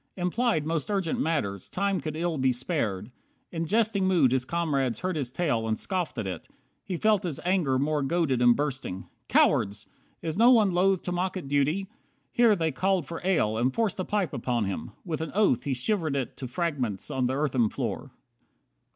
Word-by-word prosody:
Implied 180 -2 0
Most 165 +4 -2
urgent 190 -6 -1
matters, 110 - -1
time 200 0 0
could 155 -1 -4
ill 165 -2 -1
be 130 0 +3
spared. 120 - -2 0.4
In 165 -1 -3
jesting 210 -1 +2
mood 165 -9 +4
his 130 -1 +1
comrades 140 -8 -1
heard 185 -1 -1
his 135 -5 -3
tale, 125 -8 0
And 110 -1 0
scoffed 185 -4 -3
at - - -2
it. 90 -4 -5 0.4
He 180 - -4
felt 215 +1 +3
his 170 -8 -4
anger 175 -8 +2
more 150 +2 0
Goaded 135 -3 +1
and 120 -1 +6
bursting; 130 -10 -3 0.2
"Cowards! 100 +1 +2 0.4
Is 160 +1 -3
no 235 +2 +7
one 220 -6 +5
loth 185 +1 +2
To 180 - -3
mock 180 +2 -1
at 175 - -6
duty 145 +7 +1 0.2
" - - -43
Here 235 -3 +5
they 165 -3 0
called 185 +3 0
for 165 +4 -6
ale, 155 - +1
And 125 +2 +2
forced 220 0 -1
a - - 0
pipe 200 -5 -1
upon 120 -2 -1
him. 95 - -4 0.2
With 160 -3 -3
an 160 - -4
oath 200 - +3
He 140 -2 0
shivered 160 - -1
it 135 -3 -3
to 130 - -5
fragments 125 - -2
on 130 -1 0
the 130 - -1
earthen 130 -6 +1
floor. - - -4
155 Hz, 195 wpm, -27 LUFS, 130-185 Hz, 0.4 s, no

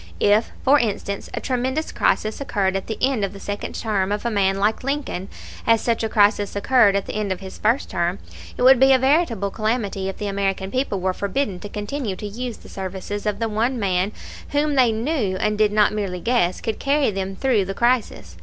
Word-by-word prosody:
If, 210 +2 +3
for 285 +2 +6
instance, 200 -3 -3
a - - -2
tremendous 260 +4 -2
crisis 215 +5 0
occurred 195 -8 0
at 195 - -3
the 220 - -4
end 260 -5 +2
of 195 0 -2
the 200 - -10
second 205 +1 -5
term 200 -3 -1
of 205 +2 -2
a 235 - 0
man 195 -2 +2
like 210 +5 0
Lincoln, 275 -9 -3 0.4
as 230 0 +5
such 230 0 0
a 220 - 0
crisis 205 -1 +2
occurred 205 -1 +4
at 200 - 0
the - - -6
end 210 -2 -2
of 185 - -2
his 190 -1 -9
first 230 +6 +1
term, 175 0 0 0.4
it - - -1
would 260 0 +7
be 265 +1 +6
a - - +6
veritable 260 - +1
calamity 215 -3 -1
if 195 - -6
the 210 - -4
American 195 -1 -1
people 255 -6 -1
were 185 0 0
forbidden 200 0 -2
to 205 - -8
continue 210 +1 -4
to 210 - -7
use 235 +3 -5
the - - -15
services 195 +2 -5
of 210 -1 0
the 230 +1 -1
one 230 +4 0
man 190 -1 0 0.4
whom 295 +1 +2
they 255 -4 +4
knew, 225 -4 -1
and 210 +2 -1
did 210 -1 +4
not 210 0 +3
merely 195 -4 -3
guess, 205 -4 +1
could 225 - -3
carry 280 -3 +2
them 195 0 -4
through 230 -4 +1
the 195 +1 -5
crisis. 235 - 0
210 Hz, 220 wpm, -22 LUFS, 195-245 Hz, 0.4 s, would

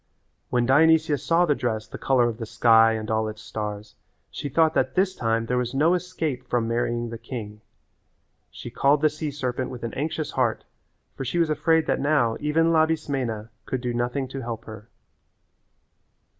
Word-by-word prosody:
When 120 -1 +1
Dionysia 155 +3 +4
saw 165 +5 +2
the 150 - +2
dress 110 -5 -3
the - - -9
colour 125 -3 +3
of 115 0 -4
the 115 - -4
sky 115 -1 +5
and 110 -1 -4
all 110 0 +1
its 110 0 -8
stars 105 -1 -6 0.4
she 145 - -5
thought 160 +3 +3
that - - 0
this 190 0 +2
time 115 0 0
there 125 +1 0
was 125 +1 -3
no 155 +5 +4
escape 165 -8 -3
from 120 -2 0
marrying 120 0 -1
the 115 - -7
king. 105 -5 -7 0.9
She 120 - -9
called 140 +4 +2
the 155 - +4
sea 155 0 -4
serpent 130 -3 -3
with 125 -2 -8
an 115 - -4
anxious 155 +2 -3
heart - - 0 0.5
for - - -5
she 135 - -3
was 165 -2 +2
afraid 160 +1 +2
that - - 0
now 140 -6 +2
even 165 +3 +2
Labismena 140 -9 0 0.2
could 130 - -2
do 125 -1 -2
nothing 120 +3 -1
to 135 0 -6
help 115 -2 -6
her. 110 0 -11
125 Hz, 185 wpm, -25 LUFS, 115-155 Hz, 0.9 s, sky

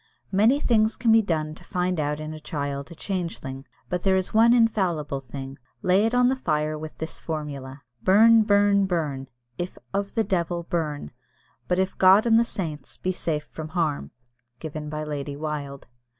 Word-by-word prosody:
Many 220 +8 +4
things 220 -5 +2
can 230 -1 +2
be 225 0 +7
done 155 -6 -2
to - - -15
find 180 -2 -1
out 150 0 -1
in 155 0 -5
a 155 - -8
child 140 -2 -4
a 170 - -10
changeling, 165 -8 -5 0.2
but 180 -1 -2
there 190 0 +3
is 185 -1 -1
one 225 +2 +6
infallible 185 - +2
thing 135 0 -8 0.2
lay 190 +4 +4
it 235 - -1
on 245 0 +5
the 260 - +2
fire 155 -10 -1
with 155 0 -8
this 160 - -5
formula, 140 -4 -6 0.2
"Burn, 225 - +6
burn, 205 -2 +3
burn 150 -7 -2 0.3
if 175 +1 -4 0.2
of 200 0 -2
the 225 - +2
devil, 175 -3 -1
burn; 155 - -3 0.6
but 180 - +1
if 190 0 +1
of - - -30
God 190 +4 +7
and 225 -1 +5
the - - +4
saints, 165 -10 -5
be 185 - -1
safe 160 -4 -2
from 155 -1 -7
harm" 150 - 0 0.5
(given 155 +1 -6
by 155 0 -4
Lady 145 -1 -4
Wilde). 145 -2 -5
170 Hz, 185 wpm, -25 LUFS, 150-200 Hz, 0.6 s, be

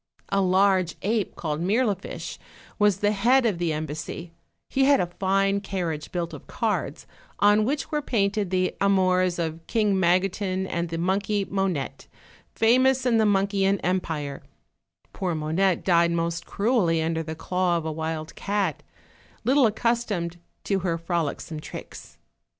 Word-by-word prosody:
A 195 0 +2
large 185 -2 +3
ape, 215 0 0
called 155 -1 -3
Mirlifiche, 205 +1 -1 0.4
was 205 -2 +3
the 205 0 +3
head 240 +6 +3
of 205 -7 +1
the 170 -2 0
em 155 +1 -2
bassy: 155 +3 -6 0.4
he 270 0 +2
had 280 0 +5
a - - +2
fine 195 +1 +2
carriage 175 -6 -4
built 170 -2 -3
of 150 - -10
cards, - - -2 0.3
on 210 +1 +5
which 285 +3 -2
were 300 -1 0
painted 200 -6 0
the 185 0 0
amors 185 -2 +3
of 165 -1 -2
King 210 -4 +2
Magotin 185 +1 +1
and 170 -2 -2
the 165 - -3
monkey 195 +3 0
Monette, 190 -9 -2 0.5
famous 255 +3 +3
in 235 -3 +3
themonkeyian 200 -2 +2
empire; 160 -6 -2 0.7
poor 180 -3 -2
Monette 165 +4 0
died 170 -2 +4
most 170 0 -2
cruelly 200 -7 +1
under 160 0 -1
the 160 0 -5
claw 180 +1 0
of 165 - -4
a 160 - -1
wild 160 0 -4
cat, 200 0 -1 0.6
little 265 -1 +4
ac 215 - -3
customed 215 -8 -1 0.3
to 195 -1 0
her 170 -2 -1
frolicsome 165 -2 -3
tricks. - - -10
190 Hz, 150 wpm, -25 LUFS, 170-205 Hz, 0.7 s, had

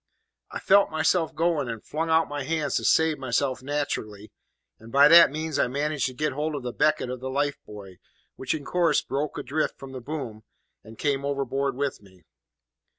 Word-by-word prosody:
"I - - -6
felt 200 +1 +4
myself 160 +1 0
going, 165 -6 0
and 115 -2 -7
flung 160 +2 -3
out 160 0 +3
my 145 -1 -4
hands 155 +2 -2
to - - -3
save 160 -1 +3
myself 130 +1 -1
naterally, 125 -7 -4 0.5
and 115 +1 -13
by 140 +3 +7
that 170 +2 +8
means 155 0 -3
I - - +3
managed 145 +1 -1
to 130 - -8
get 150 +1 -1
hold 150 +2 -2
of 140 - -5
the 125 -1 -4
becket 140 -4 +1
of 125 - -5
the 130 +1 -5
life 145 +2 -1
buoy, 100 -3 -11 0.4
which 130 - -2
in 145 -3 -7
course 175 -2 +2
broke 145 +3 -3
adrift 155 +3 -2
from 135 -1 -10
the 130 -1 -7
boom, 125 -6 -6 0.4
and 110 +1 -13
came 140 -2 -1
overboard 140 -1 -1
with 140 -3 -3
me. 95 -3 -20
140 Hz, 195 wpm, -25 LUFS, 125-155 Hz, 0.5 s, that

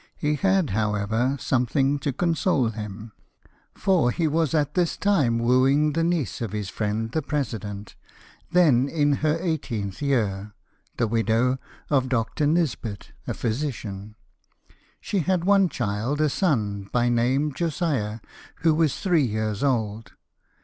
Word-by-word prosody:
He 150 0 0
had, 190 - +1
however, 110 +5 0
something 135 +3 +1
to 140 +1 -1
console 165 -4 +1
him, 105 0 -7 0.6
for 180 -10 +2
he 160 +6 0
was 160 0 +1
at 150 -1 +1
this 175 -2 0
time 150 -13 +2
wooing 130 +5 +3
the 165 +2 +1
niece 165 -8 -1
of 110 -4 -3
his 105 -2 -3
friend 110 +2 -2
the 160 - 0
president, 110 -9 -4 0.6
then 150 -8 +4
in 145 -3 +2
her 155 +1 +2
eighteenth 130 - -3
year, 105 -7 -1 0.4
the - - +2
widow 115 +3 +1 0.3
of 130 -3 +2
Dr. 125 +5 0
Nisbet, 145 -10 -1 0.2
a - - -2
physician. 110 -5 -4 0.8
She 200 - -2
had 180 +1 0
one 195 -1 +4
child, 120 +4 -2
a 155 -1 +3
son, 105 - -1
by 120 0 +2
name 130 +5 +1
Josiah, 140 - -2 0.4
who 160 -1 +4
was 155 -3 +1
three 175 -5 +2
years 110 0 -2
old. 110 -5 -1
130 Hz, 135 wpm, -24 LUFS, 110-155 Hz, 0.8 s, then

